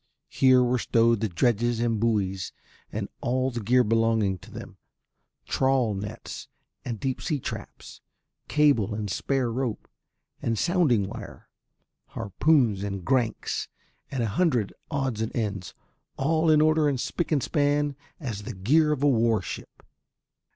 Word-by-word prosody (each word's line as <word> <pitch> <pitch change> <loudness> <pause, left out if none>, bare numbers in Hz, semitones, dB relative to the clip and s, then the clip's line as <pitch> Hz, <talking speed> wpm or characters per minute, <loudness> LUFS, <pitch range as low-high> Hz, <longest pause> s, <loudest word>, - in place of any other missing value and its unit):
Here 130 -1 +5
were 125 0 +1
stowed 115 -1 +3
the 110 0 -1
dredges 120 +4 +1
and 115 -2 0
buoys 100 -5 0 0.4
and - - -3
all 130 +2 0
the 120 - -4
gear 125 +4 +3
belonging 110 -4 +1
to - - -14
them, - - -10 0.7
trawl 130 -4 +2
nets 105 +3 -7 0.4
and 115 -4 -4
deep 130 +1 -2
sea 155 -4 -1
traps, - - -8 0.5
cable 140 -9 +3
and 105 -2 -3
spare 130 +3 0
rope 125 -2 -3 0.5
and 115 -1 -1
sounding 150 - +2
wire, - - -9 0.7
harpoons 115 - +2
and 100 -3 -4
grancs 125 -5 0 0.4
and 130 -4 -2
a 110 - 0
hundred 120 - +1 0.2
odds 135 -7 -1
and 110 - -3
ends, 100 -6 -3 0.4
all 160 +3 +2
in 155 -1 +6
order 155 -1 +4
and 135 -3 -1
spick 170 +7 -2
and 145 -4 +2
span 145 -1 +1 0.2
as 115 - -4
the 100 - -7
gear 150 +12 +3
of 145 -2 -1
a - - +5
warship. 115 -4 0
120 Hz, 145 wpm, -26 LUFS, 110-140 Hz, 0.7 s, in